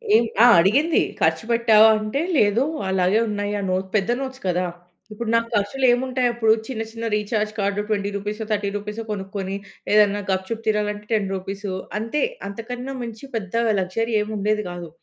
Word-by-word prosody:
ఏం 230 - +6 0.2
ఆ! - - +9
అడిగింది. 275 - +3 0.2
"ఖర్చు 160 +5 +2
పెట్టావా?" 225 -2 +6
అంటే 215 +7 -2 0.2
లేదు. 210 +3 +3 0.3
అలాగే 190 +2 +2
ఉన్నాయి. 205 0 -2
ఆ - - -3
నోట్ 185 +1 -1
పెద్ద 210 +2 +2
నోట్స్ 265 -1 -6
కదా! 180 0 +1 0.5
ఇప్పుడు 220 +1 -4
నాకు 230 0 +2
ఖర్చులేముంటాయప్పుడు. 245 +1 +2
చిన్న 235 -4 -4
చిన్న 230 0 -6
రీచార్జ్ 210 0 -1
కార్డ్ 200 0 0
20 200 -2 0
రూపీసో, 210 +2 -4
30 205 -1 0
రూపీసో, 210 +2 -6
కొనుక్కొని 195 -1 -4 0.4
ఏదైనా 205 -1 +4
గప్‌చుప్ 190 +5 -2
తీనాలంటే 210 -1 0
10 210 -3 +1
రూపీస్ 195 +2 -5 0.3
అంతే. 230 +7 -2 0.3
అంతకన్నా 245 +6 -6
మంచి 230 0 -8
పెద్ద 200 -4 -4 0.3
లగ్జరీ 225 +5 -2
ఏముండేది 210 0 -1
కాదు. 175 -1 -7
210 Hz, 150 wpm, -22 LUFS, 200-230 Hz, 0.5 s, ఆ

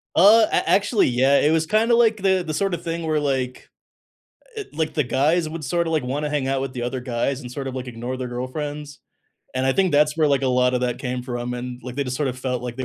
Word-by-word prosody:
Uh, 215 +6 +7
a - - +1
actually, 200 +3 +3
yeah, 130 +3 +3
it 150 - +3
was 160 0 +2
kind 215 +7 +2
of 235 - +5
like 225 -2 +4
the 190 -2 +1
the 155 - -3
sort 195 +2 0
of 170 - -4
thing 165 0 -3
where 155 -1 +1
like, 130 -3 -2 0.9
eh, 430 - -4
like 155 0 -2
the 150 - +2
guys 155 +7 +1
would 155 0 -6
sort 170 +6 0
of 165 - -2
like 155 -4 +1
wanna 145 +4 -2
hang 145 -3 -1
out 135 0 0
with 135 -1 -4
the 125 - -5
other 125 +2 -3
guys 125 +2 -2
and 125 -2 -9
sort 135 +1 -5
of 130 - -5
like 130 0 -5
ignore 125 +2 -5
their 130 -1 -4
girlfriends, 145 +4 -5 0.6
and 130 0 0
I 135 - +3
think 185 +1 +1
that's 150 +1 +3
where, 155 -2 +3
like, 140 -1 +2
a - - +1
lot 125 0 +2
of 125 - 0
that 125 -1 -1
came 125 -1 -3
from, 120 -1 -4
and 125 0 -6
like, 125 -1 -7
they 140 - 0
just 125 -1 -3
sort 145 -1 0
of 130 0 -5
felt 125 -1 -3
like 120 -1 -5
they 130 - -3
140 Hz, 275 wpm, -22 LUFS, 125-160 Hz, 0.9 s, Uh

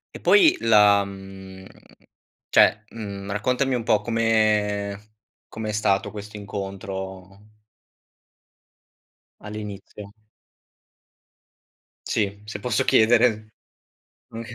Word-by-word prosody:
E - - -7
poi 355 -6 +5
la 105 -3 +5
mhmm, 95 -1 -11 0.8
cioè, 105 +1 +4
mhmm, 100 -3 -7
raccontami 125 +6 0
un 125 - -1
po' 105 -2 +2
come 105 -2 0 0.3
come 110 -1 -6
è - - -1
stato 100 -2 0
questo 105 0 -9
incontro 95 0 -8 1.9
all'inizio? 105 -1 -9 1.9
Sì, 100 -1 -2
se 105 -1 -7
posso 110 +1 0
chiedere. 110 -1 +3 0.8
Oka 115 +1 -8
105 Hz, 85 wpm, -23 LUFS, 100-110 Hz, 1.9 s, poi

